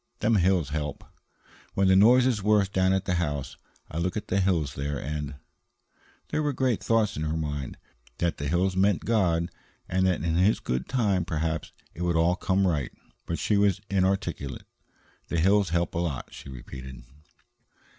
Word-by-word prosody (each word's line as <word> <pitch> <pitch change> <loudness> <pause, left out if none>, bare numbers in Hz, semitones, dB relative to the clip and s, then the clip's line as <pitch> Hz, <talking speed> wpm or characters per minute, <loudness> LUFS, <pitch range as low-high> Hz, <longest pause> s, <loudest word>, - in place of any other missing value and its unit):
Them 110 +1 +2
hills 90 -5 +2
help. 75 -1 -4 0.7
When 95 0 +3
the 95 - +5
noise 120 +6 +6
is 120 -5 +1
worst 105 -1 +2
down 95 0 +3
at 95 0 +1
the 90 - 0
house, 75 -4 -3 0.4
I 80 - -3
look 90 +3 -1
at 105 - -6
the 95 - +2
hills 85 -8 +1
there 70 +1 -3
and 75 +1 -4 0.5
" - - -35
There 155 - 0
were 145 -1 0
great 125 -4 0
thoughts 115 -3 +2
in 75 - -4
her 80 +1 -1
mind 75 -4 -4 0.4
that 85 -1 0
the 70 - -3
hills 90 +4 +1
meant 95 0 +2
God, 90 -7 +1 0.4
and 95 +1 +1
that 90 -5 0
in 85 0 0
His 95 +5 +3
good 65 +1 -3
time 105 -8 +1
perhaps 80 -1 -2 0.2
it 85 - -9
would 90 -1 +1
all 85 +2 +3
come 95 0 +1
right. 75 -8 0 0.4
But 85 - -2
she 105 - +1
was 100 -2 +3
inarticulate. 95 - -1 0.6
"The 85 - -1
hills 100 +2 +3
help 85 0 0
a 85 - -1
lot," 80 -7 -3
she - - -10
repeated. 65 0 -9
90 Hz, 185 wpm, -27 LUFS, 75-100 Hz, 0.7 s, noise